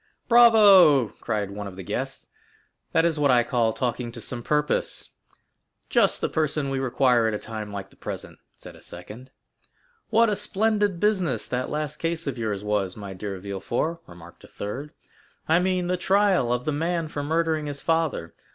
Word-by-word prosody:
"Bravo!" 200 - +7
cried 105 -3 -4
one 100 0 -6
of 95 - -9
the 95 - -8
guests; - - -4 0.7
"that 165 - +3
is 160 -3 0
what 145 -1 +3
I 125 -2 +5
call 120 -2 +1
talking 120 +1 -3
to 120 - -8
some 120 +1 -6
purpose." 150 +4 -1 0.8
"Just - - +3
the - - +1
person 150 -2 -1
we 135 - -1
require 125 -2 +2
at 110 - -1
a - - -1
time 110 -1 -7
like 100 -1 -7
the - - -21
present," - - -8 0.2
said - - -12
a - - -16
second. 105 +9 -11 0.8
"What 230 +1 +4
a 210 - +1
splendid 205 -2 0
business 185 - 0
that 125 +1 -2
last 150 0 -3
case 165 0 -2
of 135 -4 -4
yours 105 -3 -2
was, 105 -2 -1
my 100 -2 -7
dear 95 +1 -5
Villefort!" 100 - -3
remarked 85 -1 -14
a - - -13
third; 130 +9 -7 0.5
"I 160 +2 +4
mean 180 0 0
the 180 +1 0
trial 190 -8 +2
of 125 0 -1
the 155 - 0
man 165 +2 -1
for 150 -1 -5
murdering 160 0 0
his 145 -1 -6
father. 160 - 0
140 Hz, 180 wpm, -25 LUFS, 110-170 Hz, 0.8 s, Bravo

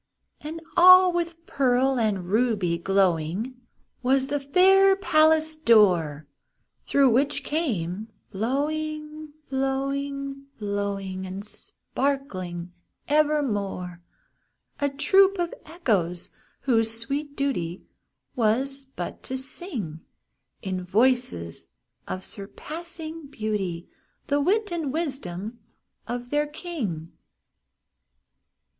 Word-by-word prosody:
And 315 +2 -6 0.2
all 365 0 +8
with 340 -1 -3
pearl 265 -2 +2
and 205 -5 0
ruby 210 -7 +1
glowing 195 +6 0 0.4
Was 265 +1 +3
the 290 0 0
fair 385 +7 +5
palace 315 -4 +4
door, 180 - +4 0.6
Through 275 -3 +4
which 275 +5 +2
came 215 - -2 0.2
flowing, 305 +7 -2 0.2
flowing, 275 +1 -2
flowing, 200 -2 -3
And 190 +2 -6
sparkling 185 -9 -4 0.4
evermore, 215 - 0 0.8
A 285 -1 +1
troop 385 +8 +4
of 345 -1 -1
Echoes, 205 - -1 0.3
whose 225 -4 +2
sweet 285 +4 -3
duty 185 -12 -2 0.5
Was 265 +4 +1
but 220 -10 -7
to 260 - -4
sing, 260 - -4 0.6
In 185 -1 -3
voices 200 - +1 0.4
of 185 - -4
surpassing 320 - -7
beauty, 210 -9 -3 0.4
The 285 0 +1
wit 410 +5 +1
and 325 -5 -2
wisdom 240 - -4 0.5
of 245 +1 -5
their 295 0 +1
king. 270 - -5
265 Hz, 90 wpm, -25 LUFS, 195-305 Hz, 0.8 s, all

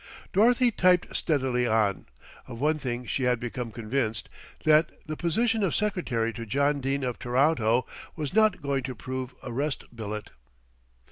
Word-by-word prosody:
Dorothy 240 +4 +4
typed 180 -4 +3
steadily 130 -5 +1
on. 110 -4 +1 0.4
Of 115 -2 -8
one 155 +3 +1
thing 125 -3 -3
she 130 - -2
had 125 -1 +2
become 120 -1 -4
convinced, 115 0 -2 0.3
that 155 +1 +5 0.2
the 155 - -4
position 225 +8 +1
of 185 - +1
secretary 135 - 0
to 115 +2 -6
John 140 +4 +1
Dene 135 +1 -1
of 125 -2 -2
Toronto 125 -2 +2 0.3
was 150 -2 -4
not 215 -6 +3
going 140 -1 0
to 130 0 -5
prove 130 +3 -5
a 125 - -6
rest 140 +2 -2
billet. 105 -2 -5
130 Hz, 155 wpm, -27 LUFS, 120-155 Hz, 0.4 s, that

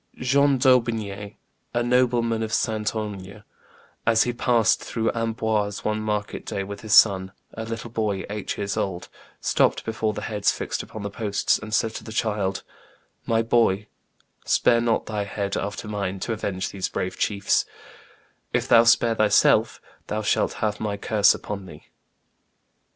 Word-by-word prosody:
John 140 +2 +3
d'Aubigne, 115 -6 +1 0.4
a 120 - +2
nobleman 120 -2 +2
of 110 -1 -3
Saintonge, 105 -3 -3 0.6
as 110 -1 +4
he 120 - -2
passed 120 -2 +2
through 115 -1 -1
Amboise 110 -3 -1
one 110 0 0
market 105 -1 -3
day 100 - -3
with 100 +1 -8
his 110 -2 +2
son, 95 -2 +5 0.2
a 110 - -5
little 115 +1 -6
boy 105 -4 -1
eight 105 0 -4
years 100 -1 -2
old, 90 -2 -3 0.3
stopped - - +1
before 110 -1 -1
the - - -6
heads 105 -3 +1
fixed - - -3
upon 110 - -9
the 100 - -4
posts, 100 -1 0
and 110 - -9
said 110 +1 +1
to - - -7
the 110 - -9
child, 105 -4 -1 0.6
"My 115 0 +2
boy, 115 -4 +2 0.6
spare 115 -1 +3
not 115 -1 +1
thy 105 -2 -2
head, 100 0 -3
after 100 +1 -4
mine, 100 -2 -3
to 115 - -2
avenge 95 -3 -3
these 95 -2 -3
brave 90 - -4
chiefs; 100 -2 +1 0.9
if - - 0
thou 115 0 +6
spare 115 0 +4
thyself, 110 -2 +3 0.3
thou 110 +1 -2
shalt 105 - +1
have 105 -1 -2
my 105 -2 -2
curse 105 0 +3
upon 100 -2 -6
thee." - - -14
110 Hz, 155 wpm, -24 LUFS, 100-115 Hz, 0.9 s, thou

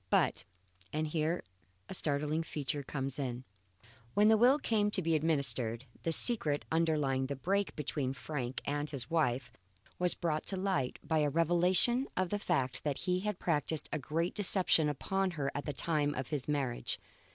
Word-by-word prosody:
But - - +1 0.5
and 155 +1 -1
here 160 +2 -1 0.4
a - - -7
startling 150 -1 0
feature 145 -3 -3
comes 135 0 -4
in 125 -2 -3 0.7
when 210 +1 +5
the 220 - +6
will 250 +5 +5
came 215 -7 +1
to 205 -2 +1
be 165 0 +1
administered, 140 -7 +1 0.2
the 165 - -1
secret 160 - +5
underlying 150 -5 +1
the 140 - -3
break 195 +9 -1
between 145 -3 -2
Frank 130 -2 -4
and 145 +1 -2
his 140 +1 -4
wife 130 -6 0 0.5
was 180 -1 +2
brought 155 -3 -2
to 195 - +2
light 185 -10 -1
by 160 -1 0
a 150 -1 +2
revelation 175 - +3
of 185 -1 +1
the 205 - -1
fact 135 -10 -1
that 145 -3 -1
he 180 -1 +1
had 210 0 -3
practised 160 -2 -1
a 155 - -1
great 165 +5 -2
deception 185 -6 +3
upon 190 +7 -1
her 140 -1 -1
at 145 - -4
the 150 - -2
time 150 0 +1
of 130 -1 -4
his 145 -4 -3
marriage. 140 -5 -2
155 Hz, 175 wpm, -32 LUFS, 140-180 Hz, 0.7 s, the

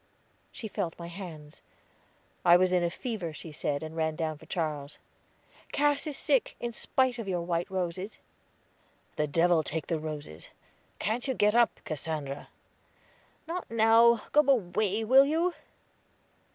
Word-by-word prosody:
She 225 - -6
felt 170 -5 -3
my 170 0 -7
hands. 165 -5 -9 0.8
I 175 0 +7
was 185 0 +2
in 180 -1 +3
a 170 - +2
fever, 185 -4 -4
she 160 +1 -9
said, 145 -1 -2
and 160 0 -7
ran 160 -1 0
down 155 -2 -3
for 160 - -15
Charles. 155 -5 -3 0.7
"Cass 290 +1 +1
is 295 - -3
sick, 275 -5 +1
in 240 - -3
spite 250 +2 0
of 225 - -5
your 180 -3 -1
white 170 0 -1
roses." 185 +2 -3 1.0
"The 150 -1 0
devil 165 +2 +3
take 155 +1 -3
the 165 -2 -1
roses. 150 - -7 0.5
Can't 230 +5 -2
you 260 - 0
get 210 -1 +3
up, 235 0 +3
Cassandra?" 150 -2 -4 1.0
"Not 350 +2 -4
now. 230 0 +5
Go 295 - +5
away, 215 -5 +1
will 265 +5 +6
you?" 335 +4 +1
180 Hz, 150 wpm, -29 LUFS, 160-235 Hz, 1.0 s, I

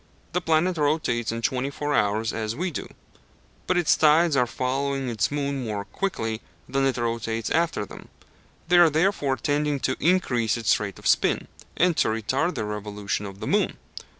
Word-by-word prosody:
The 180 - 0
planet 165 +2 +2
rotates 145 -7 0
in 115 0 -5
twenty 130 +4 0
four 145 +1 -3
hours 110 -1 +1
as 110 0 -3
we 180 +5 -2
do; - - -5 0.8
but 185 - +2
its 175 -3 +4
tides 155 +1 +4
are 125 -2 +3
following 135 +2 -1
its 110 -3 0
moon 140 -2 -2
more 105 -3 -3
quickly 110 - -3 0.3
than 135 0 +1
it 130 - -1
rotates 115 -2 -2
after 165 -10 +1
them; - - -12 0.6
they 175 +1 +5
are 175 -2 +7
therefore 155 -4 +1
tending 145 0 0
to 130 - 0
increase 125 - +2
its 115 -2 +2
rate 100 -2 -5
of - - -14
spin, - - +2 0.3
and 175 -1 +3
to - - +3
retard 130 - 0
the - - -2
revolution 105 -1 -4
of 100 0 -10
the - - -3
moon. - - +1
135 Hz, 180 wpm, -25 LUFS, 110-155 Hz, 0.8 s, are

